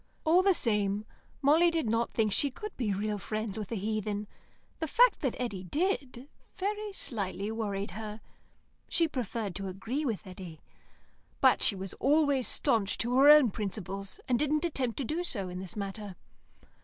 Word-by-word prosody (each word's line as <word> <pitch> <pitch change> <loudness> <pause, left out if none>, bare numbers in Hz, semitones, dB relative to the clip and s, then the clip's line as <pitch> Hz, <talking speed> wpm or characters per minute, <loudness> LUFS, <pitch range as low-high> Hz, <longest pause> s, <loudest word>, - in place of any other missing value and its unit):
All 335 +4 +5
the 385 -1 +4
same, 210 -4 +1 0.4
Molly 320 +5 +6
did 330 -7 -1
not 230 +2 +1
think 215 -2 +1
she 285 - +1
could 420 +10 -8
be 230 -5 -1
real 205 +1 -1
friends 215 0 -3
with 210 -1 -6
a - - -1
heathen. 210 0 -2 0.5
The 320 - -2
fact 485 - +5
that 265 -5 -1
Eddy 205 -7 -3
did, 280 - -2 0.3
very 415 +2 -2
slightly 205 - -3
worried 205 -3 -3
her; 215 +2 -6 0.7
she 335 -1 +3
preferred 230 - -3
to 195 -1 -4
agree 225 +10 -3
with 225 -6 -2
Eddy. 180 -4 -9 0.8
But - - +5
she 205 - +3
was 190 -1 -5
always 285 -2 +3
staunch 225 -8 +2
to 240 +2 -1
her 285 +2 +8
own 295 -7 +8
principles, 195 -1 -4
and 245 -3 +2
didn't 300 +2 +1
attempt 260 -8 -1
to 275 - -2
do 320 +9 -2
so 200 - -3
in 180 0 -6
this 190 +3 -6
matter. 200 -1 -5
225 Hz, 170 wpm, -30 LUFS, 200-290 Hz, 0.8 s, her